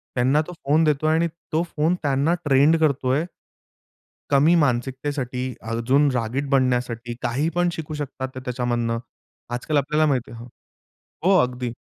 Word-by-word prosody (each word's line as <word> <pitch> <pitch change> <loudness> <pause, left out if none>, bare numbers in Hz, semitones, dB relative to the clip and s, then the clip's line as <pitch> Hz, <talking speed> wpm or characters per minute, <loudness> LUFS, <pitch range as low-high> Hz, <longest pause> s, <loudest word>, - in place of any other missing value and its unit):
त्यांना 130 +5 +3
तो 180 - -7
फोन 150 +4 +3
देतोय 155 +1 +2
आणि 170 +1 +2 0.2
तो 160 - +2
फोन 160 +4 +2
त्यांना 140 +3 +2
ट्रेंड 145 +4 +4
करतोय. 140 -1 +1 1.1
कमी 145 +5 +5
मानसिकतेसाठी 130 0 -2 0.3
अजून 130 +5 +2
रागीट 125 +4 -2
बनण्यासाठी 125 -3 0
काही 140 +7 0
पण 175 0 +2
शिकू 160 -2 -6
शकतात 135 -3 -5
ते 130 - -6
त्याच्यामधनं. 120 -2 -1 0.5
आजकाल 125 +5 -2
आपल्याला 150 +2 +2
माहिती 130 -5 0
आहे 115 - -9 0.8
हो, 190 +2 +4
अगदी. 125 -1 -1
135 Hz, 135 wpm, -23 LUFS, 125-155 Hz, 1.1 s, कमी